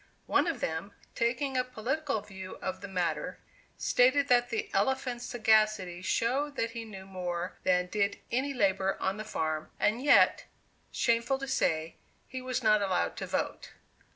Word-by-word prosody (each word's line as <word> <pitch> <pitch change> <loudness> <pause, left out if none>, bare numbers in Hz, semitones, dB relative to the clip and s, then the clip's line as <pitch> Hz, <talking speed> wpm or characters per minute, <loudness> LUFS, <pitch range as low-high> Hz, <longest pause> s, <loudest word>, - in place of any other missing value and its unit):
One - - +2
of - - -2
them, 160 +5 -3 0.2
taking 255 +4 0
a 255 - +3
political 255 +1 -2
view 190 -2 -9
of 185 0 -5
the 200 - -6
matter, 180 -3 -2 0.4
stated 275 +3 +3
that 245 -1 +4
the 435 -1 -3
elephant's 255 -2 0
sagacity 215 -6 +2
showed 270 +9 0
that 230 -3 -1
he 230 -1 -6
knew 195 -3 -9
more 180 -2 -4
than 180 -1 +3
did 200 +2 0
any 260 +4 0
laborer 195 -6 +1
on 190 +2 -1
the 215 - -4
farm, 155 -7 -2
and 220 +4 +2
yet, 290 - +5 0.5
shameful 235 +3 +1
to 275 0 -6
say, 160 -10 0 0.3
he 260 - -6
was 255 -1 -2
not 215 -1 +5
allowed 190 -3 0
to - - -4
vote. - - -3
220 Hz, 160 wpm, -30 LUFS, 190-255 Hz, 0.5 s, yet